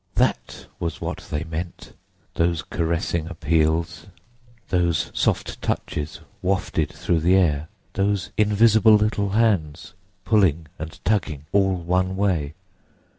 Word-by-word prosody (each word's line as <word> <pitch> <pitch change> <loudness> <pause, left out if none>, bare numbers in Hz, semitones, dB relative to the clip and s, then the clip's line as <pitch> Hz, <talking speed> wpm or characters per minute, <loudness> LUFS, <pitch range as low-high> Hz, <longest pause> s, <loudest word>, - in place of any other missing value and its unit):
That - - 0
was 85 -1 -3
what - - -5
they 75 +1 -2
meant, 80 +2 -6 0.4
those 85 -2 0
caressing 85 0 -1
appeals, 80 +1 0 0.6
those 85 -5 +1
soft - - -1
touches 75 +1 -3 0.2
wafted 90 -5 0
through 85 - -1
the 90 +4 +3
air, 80 -5 +2 0.3
those 100 -1 0
invisible 110 +1 +5
little 105 -1 +1
hands 95 -8 0 0.3
pulling 90 -7 +3
and 80 +1 -7
tugging, 80 -9 0
all 95 -1 +3
one 90 +2 0
way! 85 -7 0
85 Hz, 115 wpm, -23 LUFS, 80-100 Hz, 0.6 s, invisible